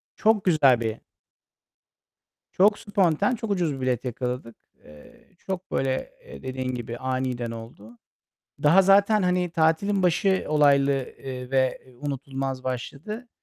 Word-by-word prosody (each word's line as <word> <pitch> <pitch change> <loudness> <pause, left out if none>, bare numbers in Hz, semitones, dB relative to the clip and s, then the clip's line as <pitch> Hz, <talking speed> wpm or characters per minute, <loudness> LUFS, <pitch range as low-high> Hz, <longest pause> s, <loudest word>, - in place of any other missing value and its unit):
Çok 215 -2 +2
güzel 140 -9 +5
bir 110 -1 -3 1.5
çok 205 +3 +3
spontane, 200 +2 +1
çok 220 -2 -5
ucuz 175 -6 0
bir 135 - -7
bilet 130 0 -1
yakaladık. 125 -1 -4 0.3
Eee, 75 0 -17
çok 190 -1 -6
böyle, 135 - -1
eee, - - -12
dediğin 130 -1 -3
gibi 120 0 -6
aniden 130 -2 -2
oldu. 115 0 -11 0.7
Daha 165 +6 +6
zaten, 200 +2 +4
hani, 180 -1 +1
tatilin 165 +5 +1
başı 190 +2 +2
olaylı, 140 -2 +4 0.3
eee, 125 -1 -7
ve 130 -1 +1 0.2
unutulmaz 135 -2 -4
başladı. 140 - -5
140 Hz, 125 wpm, -25 LUFS, 130-190 Hz, 1.5 s, Daha